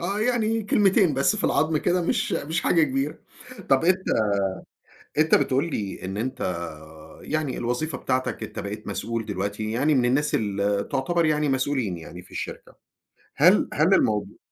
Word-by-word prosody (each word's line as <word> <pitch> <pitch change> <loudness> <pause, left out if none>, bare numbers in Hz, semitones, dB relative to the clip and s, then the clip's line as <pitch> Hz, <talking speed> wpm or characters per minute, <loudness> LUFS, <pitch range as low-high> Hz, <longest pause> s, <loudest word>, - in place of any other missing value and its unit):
آه، 195 +5 -2
يعني 235 -1 +1
من 225 -1 -1
كلمتين 195 - +3
بس 140 +10 +2
في - - -3
العضم 155 +2 +2
كده، 180 +2 +1
مش 215 +3 0
مش 160 +1 -1
حاجة 165 - +3
كبيرة، 135 0 -1 0.5
طَب 135 +4 +3
أنت 185 +1 +2 1.1
أنت 155 +1 +4
بتقول 140 +5 +2
لي 100 -6 -4
إن 95 +1 -4
أنت 120 +5 -3 0.8
يعني 155 -4 -2
الوظيفة 125 +7 -2
بتاعتك 130 -2 -2
أنت - - -7
بقيت 105 +2 -6
مسؤول 115 -2 -3
دلوقتي 105 +2 -3
يعني 140 +6 +2
من 130 -3 +3
الناس 135 +5 +1
اللي 100 -1 0
تُعتبر 170 +5 +1
يعني 150 -1 +1
مسؤولين 130 -8 0
يعني 85 +2 -10
في - - -21
الشركة، - - -7 0.6
هل - - +5
هل - - +3
الموضوع 105 -1 +1
135 Hz, 160 wpm, -25 LUFS, 110-170 Hz, 1.1 s, هل